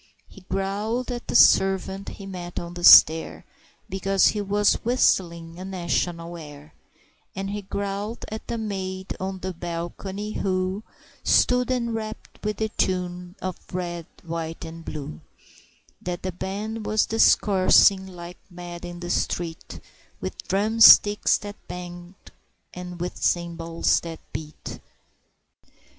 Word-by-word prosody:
He 200 - -15
growled 205 +6 -2
at 240 0 -6
the - - -3
servant 195 +1 +4
he 195 - -9
met 180 -2 -7
on 170 0 -7
the 175 0 -8
stair, 160 -1 +7 0.4
Because 195 0 +2
he 210 - -2
was 205 +1 +2
whistling 170 -8 +1
a - - -6
national 175 -2 -2
air, 150 -1 -12 0.6
And 195 0 -4
he 205 0 -4
growled 200 +3 -4
at 220 - -6
the 235 - -3
maid 190 -3 -4
on 190 0 -3
the 185 0 -4
balcony, 175 +5 -5
who 185 0 -1 0.4
Stood 250 0 +3
enrapt 230 -3 -4
with 210 0 -2
the 220 0 -1
tune 180 -2 -2
of 185 -2 -3
"The - - -9
Red, 175 -2 -4 0.2
White 165 -1 -5
and 165 0 -9
Blue" 140 - -7 0.8
That 175 0 -5
a 185 - -1
band 210 +5 -5
was 215 0 +2
discoursing 195 -3 +4
like 175 -1 -10
mad 175 -1 -9
in 175 0 -7
the 175 0 -4
street, 165 -2 -3 0.4
With - - -7
drumsticks 210 +1 +6
that 205 0 -9
banged, 175 0 -8 0.6
and 180 -1 -8
with 175 +1 -4
cymbals 170 -1 0
that 165 -1 -7 0.2
beat. 155 -1 -7
185 Hz, 130 wpm, -24 LUFS, 175-205 Hz, 0.8 s, stair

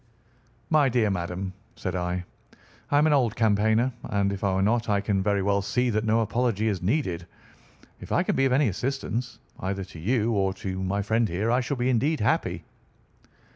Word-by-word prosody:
"My 150 -3 +5
dear 115 -4 +2
madam," 95 +1 -3 0.2
said 90 -1 -4
I, 90 0 -2 0.6
"I 145 - +3
am 150 - +5
an 155 - +4
old 120 -6 +2
campaigner, 110 +2 +2
and 100 -1 0
if 100 - -6
I 95 -2 +1
were 95 - +1
not 115 +2 +1
I 100 -1 +3
can 100 -1 0
very 100 0 +1
well 100 0 +2
see 125 +4 0
that 110 0 0
no 110 +1 +3
apology 110 -1 0
is 100 -4 -2
needed. 90 - -1 0.7
If - - -10
I - - +3
can - - 0
be 135 - +3
of 135 - +2
any 135 +1 +3
assistance, 125 +2 -3 0.2
either 95 +1 -3
to 90 -3 -11
you 115 +5 +1
or 95 -3 +1
to 95 -1 -4
my 100 +2 -1
friend 110 +1 +1
here, 100 +7 0
I 125 +2 +3
shall 135 +3 -3
be 120 +1 0
indeed 140 +6 +1
happy." 105 - 0
105 Hz, 200 wpm, -26 LUFS, 95-120 Hz, 0.7 s, My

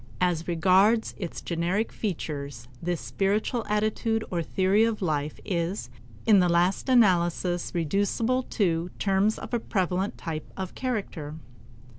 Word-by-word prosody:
As 170 -2 +1
regards 190 +6 +3
its 175 -4 -5
generic 175 +6 -1
features, 145 - -4
this 175 -1 -1
spiritual 210 +4 0
attitude 215 +1 0
or 175 -2 0
theory 190 +5 +2
of 225 -1 +1
life 150 -3 -1
is 175 +2 -2 0.3
in 210 -3 +6
the 180 -1 +3
last 175 +8 +2
analysis 175 -6 +3
reducible 205 - +1
to 175 -5 0
terms 200 +2 +2
of - - -8
a 240 - +2
prevalent 190 -2 -1
type 155 -2 -5
of 190 -1 -4
character. 195 - -3
185 Hz, 130 wpm, -27 LUFS, 170-210 Hz, 0.3 s, in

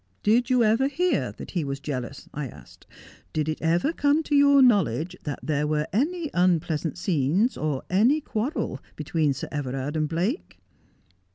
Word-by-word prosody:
" - - -42
Did 235 +4 +3
you 250 -2 +4
ever 225 +5 +3
hear 355 +6 0
that - - -9
he 175 -4 -1
was 140 -1 -4
jealous? 135 -2 -5
" - - -38
I 150 -2 -4
asked. - - -15 0.2
" - - -25
Did 155 -1 -1
it 155 - -3
ever 170 - +1
come 290 0 +2
to 295 - 0
your 280 -1 +6
knowledge 180 - +2
that 145 -2 -3
there 150 -1 0
were 150 0 0
any 310 - 0
unpleasant 170 -3 +1
scenes, 180 - +1
or 150 -4 -2
any 235 +11 +3
quarrel 265 +1 -3 0.2
between 155 -3 0
Sir 135 - -4
Everard 135 0 -3
and 155 -1 0
Blake?" 185 - -2
175 Hz, 180 wpm, -25 LUFS, -, 0.2 s, your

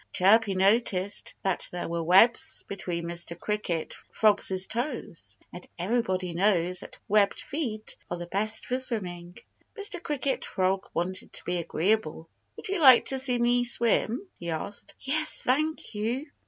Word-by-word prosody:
Chirpy 200 +2 +4
noticed 195 0 +1
that 190 -2 0
there 175 - -5
were 170 0 -3
webs 190 +8 +4
between 175 -4 -4
Mr. 170 0 -4
Cricket 195 -6 -3 0.2
Frog's 200 -3 +3
toes. 240 - -5 0.2
And 175 - -10
everybody 185 -2 -1
knows 180 -1 +1
that - - -9
webbed 205 -1 +2
feet 235 -8 -4
are 175 - -4
the 175 - -6
best 210 +5 0
for 255 +1 -1
swimming. 180 -8 -2 0.4
Mr. 400 -4 -2
Cricket 280 -4 -2
Frog 190 0 -1
wanted 185 +2 -2
to - - -7
be 180 0 -2
agreeable. 170 -1 -1 0.3
"Would - - -8
you 395 -1 -1
like 265 -5 +7
to 265 - +4
see 255 -2 +2
me 240 +1 +2
swim?" 240 - +1
he 170 - -6
asked. 165 +5 -5
"Yes, 310 +3 +4
thank 305 +4 0
you!" 230 +7 -2
205 Hz, 150 wpm, -27 LUFS, 180-245 Hz, 0.4 s, like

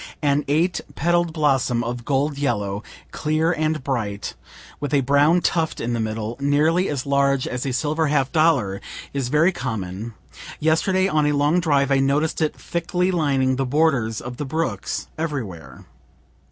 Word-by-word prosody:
An 145 0 +2
eight 170 +5 +1
petal'd 175 +1 +1
blossom 135 -6 +1
of 120 0 -4
gold 140 +1 0
yellow, 105 -7 -1 0.3
clear 155 +2 0
and 155 -3 -1
bright, 110 -7 -3 0.5
with 145 +1 -1
a 140 - +4
brown 145 +6 +4
tuft 165 -2 0
in 120 +1 -2
the 115 - -1
middle, 110 +1 -3
nearly 150 +6 +2
as 140 -3 -3
large 140 -1 +2
as 125 +2 -3
a - - -1
silver 155 +5 0
half 135 -3 +1
dollar, 140 -12 +2 0.3
is 135 -3 -2
very 155 +6 +4
common; 110 - -5 0.4
yesterday 185 +5 +2
on 155 -5 +2
a 150 - +2
long 145 +4 +2
drive 145 -4 +2
I 135 - +4
noticed 145 +5 +1
it 155 - 0
thickly 180 +2 -1
lining 135 -6 +1
the 135 - +1
borders 130 -6 +1
of 125 0 -7
the 145 - -3
brooks 135 -8 -2
everywhere. 100 - -5
140 Hz, 160 wpm, -22 LUFS, 125-155 Hz, 0.5 s, a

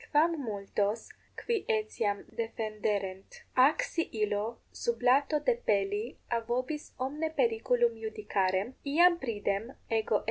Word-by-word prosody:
quam 320 +3 +4
multos, 205 0 -2 0.4
qui 470 -1 +2
etiam 215 -1 0 0.2
defenderent? 210 -4 -3 0.2
Ac 405 +12 0
si 330 - -1
illo 210 +3 -1 0.2
sublato 285 - +3
depelli 205 - +1 0.3
a 235 - +2
vobis 255 +5 -2 0.2
omne 305 +3 -2
periculum 470 +1 +2
iudicarem, 205 - 0 0.2
iam 345 0 +6
pridem 210 +2 -1 0.2
ego 220 -1 +2
L. - - +4
230 Hz, 110 wpm, -31 LUFS, 205-320 Hz, 0.4 s, iam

